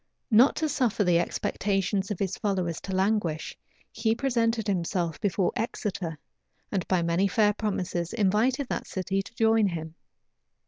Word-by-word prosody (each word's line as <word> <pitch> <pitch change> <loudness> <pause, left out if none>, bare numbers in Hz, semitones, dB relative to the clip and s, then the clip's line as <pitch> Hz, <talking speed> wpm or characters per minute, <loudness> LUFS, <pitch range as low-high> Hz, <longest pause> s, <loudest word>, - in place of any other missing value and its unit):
Not 235 +6 +6
to 315 - 0
suffer 250 -8 +1
the 175 -2 +4
expectations 195 +2 -1
of 205 - -2
his 195 -1 -1
followers 185 -5 -1
to 195 - -6
languish, 190 -5 0 0.4
he 225 0 0
presented 230 -4 0
himself 175 -4 -1
before 195 -2 +1
Exeter; 195 -7 -3 0.5
and 195 -3 -1
by 180 -2 +2
many 170 +4 +2
fair 210 +1 +3
promises 185 -5 -2
invited 230 +6 +1
that - - -3
city 190 +1 -1
to 200 +4 -13
join 225 -2 +4
him. 160 -3 -5
195 Hz, 145 wpm, -27 LUFS, 180-220 Hz, 0.5 s, Not